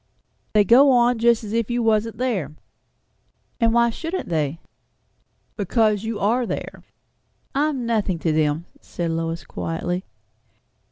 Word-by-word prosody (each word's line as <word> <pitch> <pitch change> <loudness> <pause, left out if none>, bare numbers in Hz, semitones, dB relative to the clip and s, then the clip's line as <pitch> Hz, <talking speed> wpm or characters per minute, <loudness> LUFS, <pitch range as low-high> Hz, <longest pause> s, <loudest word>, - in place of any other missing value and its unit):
"They 210 -1 +5
go 255 +7 +6
on 245 -2 +3
just 235 0 +3
as 210 0 -6
if 230 -1 0
you 240 0 0
wasn't 225 0 +1
there!" 195 - -2 1.0
"And 230 -2 +3
why 235 0 +3
shouldn't 330 - -5
they?" 155 -1 -1 1.0
"Because 215 0 +1
you 225 -1 -3
are 235 +5 +1
there." - - -5 0.7
"I 290 +3 +2
am 265 -5 -3
nothing 215 -6 0
to 160 0 -1
them," 155 +1 0
said 170 -1 -4
Lois 165 0 -3
quietly. 175 +2 -4
220 Hz, 135 wpm, -22 LUFS, 170-235 Hz, 1.0 s, go